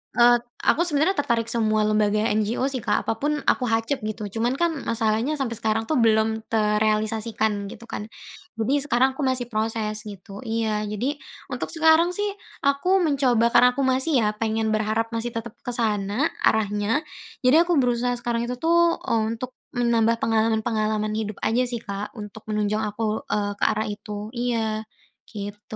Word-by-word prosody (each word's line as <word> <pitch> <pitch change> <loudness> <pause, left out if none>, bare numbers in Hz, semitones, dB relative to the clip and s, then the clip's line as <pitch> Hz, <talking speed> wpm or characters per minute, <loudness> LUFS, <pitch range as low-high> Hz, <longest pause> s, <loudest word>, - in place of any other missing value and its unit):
Eee, 240 0 +6 0.2
aku 345 +3 +3
sebenarnya 310 +4 +2
tertarik 235 -5 0
semua 215 -2 +2
lembaga 215 0 +2
NGO 215 +4 0
sih, 260 - -2
Kak, 210 -3 0
apapun 290 +6 -1
aku 250 - +1
hacep, 225 +5 0
gitu. 215 0 -5 0.2
Cuman 240 +3 +1
kan 340 +2 +1 0.2
masalahnya 230 +5 +1
sampai 235 -5 -3
sekarang 220 0 0
tuh 265 +3 0
belum 220 0 +2
terealisasikan, 215 -1 0
gitu 230 - -10
kan. 215 -2 -6 0.5
Jadi 225 +5 0
sekarang 260 +2 +3
aku 285 - -6
masih 250 -2 0
proses, 215 -1 -2
gitu. 200 0 -9
Iya, 220 -2 -1
jadi 255 +8 -2 0.3
untuk - - -3
sekarang 325 +2 +4
sih, 410 - -1 0.4
aku 355 +7 +2
mencoba 255 -6 +2
karena 250 +1 +6
aku 275 - 0
masih 260 0 +2
ya, - - +2
pengen 220 0 -1
berharap 215 +1 0
masih 230 0 -3
tetap 230 -1 -5
ke 245 - -4
sana 215 +3 0
arahnya 215 +5 +1 0.4
jadi 310 +7 +6
aku 345 -2 +2
berusaha 245 0 +1
sekarang 235 -1 -1
itu 250 - -3
tuh 340 +1 +3
untuk 230 +3 -1 0.2
menambah 230 -1 +2
pengalaman-pengalaman 220 -1 +1
hidup 215 -2 -3
aja 245 +3 +2
sih, 240 -2 -4
Kak, 200 +2 -6
untuk 215 0 -9
menunjang 210 0 0
aku, 215 +1 -2
eee, 205 -1 -1
ke - - -2
arah 215 0 0
itu, 210 +1 -6
iya, 225 -3 -1 0.4
gitu. 205 0 -7
225 Hz, 160 wpm, -24 LUFS, 215-250 Hz, 0.5 s, Eee